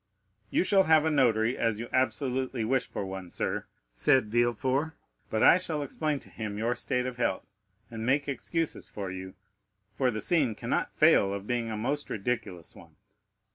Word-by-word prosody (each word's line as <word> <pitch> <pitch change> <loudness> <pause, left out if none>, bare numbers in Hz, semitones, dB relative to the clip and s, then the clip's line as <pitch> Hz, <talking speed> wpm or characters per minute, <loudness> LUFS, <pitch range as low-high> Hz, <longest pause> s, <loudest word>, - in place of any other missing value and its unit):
"You - - +2
shall 190 0 +4
have 160 -1 +5
a 160 - +2
notary, 120 -4 +3
as 115 -2 0
you 120 - -5
absolutely 130 -2 0
wish 130 +3 +1
for 100 - -4
one, 95 -1 -7
sir," - - -3 0.2
said 105 - +2
Villefort; 130 +6 +1 0.4
"but 110 - 0
I 180 - +7
shall 160 -5 -2
explain 150 +1 -2
to - - -16
him 105 -2 -5
your 115 +3 0
state 125 +1 -1
of 125 -1 -5
health, 100 -3 -2 0.4
and 110 -1 -5
make 140 +4 +1
excuses 160 +4 -3
for 100 -3 -5
you, 95 0 -7 0.6
for 130 +4 +1
the 110 -3 -3
scene 135 - +2
cannot - - -2
fail 100 - +5
of 100 0 -4
being 120 0 -1
a 110 - -3
most 140 +7 -2
ridiculous 100 -6 -4
one." - - -16
120 Hz, 175 wpm, -29 LUFS, 110-140 Hz, 0.6 s, I